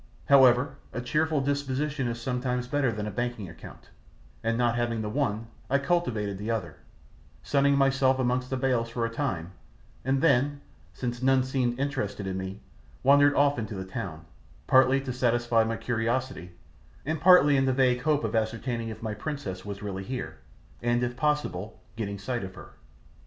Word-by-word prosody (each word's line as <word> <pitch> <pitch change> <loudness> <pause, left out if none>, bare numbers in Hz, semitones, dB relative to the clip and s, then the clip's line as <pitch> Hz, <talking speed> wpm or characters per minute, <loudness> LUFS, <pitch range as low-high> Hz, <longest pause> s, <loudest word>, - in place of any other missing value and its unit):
However, 135 0 +5 0.2
a - - -3
cheerful 155 +4 0
disposition 140 0 -1
is 120 0 -3
sometimes 125 0 -2
better 135 -2 +1
than 105 -1 -4
a 105 - -4
banking 120 -1 -3
account, 85 - -13 0.5
and 115 0 0
not 120 -1 +2
having 120 -2 -1
the 105 - -3
one 115 -4 -1 0.2
I 140 - +4
cultivated 125 - -1
the 105 +2 -4
other, 95 -10 -3 0.7
sunning 140 0 +3
myself 135 -1 +3
amongst 125 0 0
the 130 - -1
bales 125 -3 0
for 115 0 -2
a 115 - -3
time, 95 - -2 0.5
and 135 +1 +1
then, 140 -1 +3 0.3
since 120 -1 -4
none 130 0 +4
seemed 130 -2 -1
interested 130 -8 -2
in 95 -1 -3
me, 95 +1 -5 0.4
wandered 145 +1 +6
off 145 -2 +3
into 110 -1 -4
the 95 -1 -5
town, 85 -4 -6 0.4
partly 130 +1 +5
to 130 -2 -4
satisfy 120 -2 +2
my 115 0 -2
curiosity, 120 -5 -2 0.5
and 155 0 -2
partly 165 -5 +7
in 135 0 +3
the 130 - +2
vague 125 -1 +2
hope 150 -2 +1
of 110 0 -2
ascertaining 115 +1 -1
if 110 - -8
my 110 -1 -2
princess 105 -7 -5
was 100 0 -6
really 95 -2 -4
here, 125 +5 -5 0.4
and, 120 +1 +1
if 120 0 -2
possible, 120 - -1 0.2
getting 100 -3 -4
sight 120 +4 -3
of 95 0 -7
her. - - -12
125 Hz, 175 wpm, -27 LUFS, 110-135 Hz, 0.7 s, partly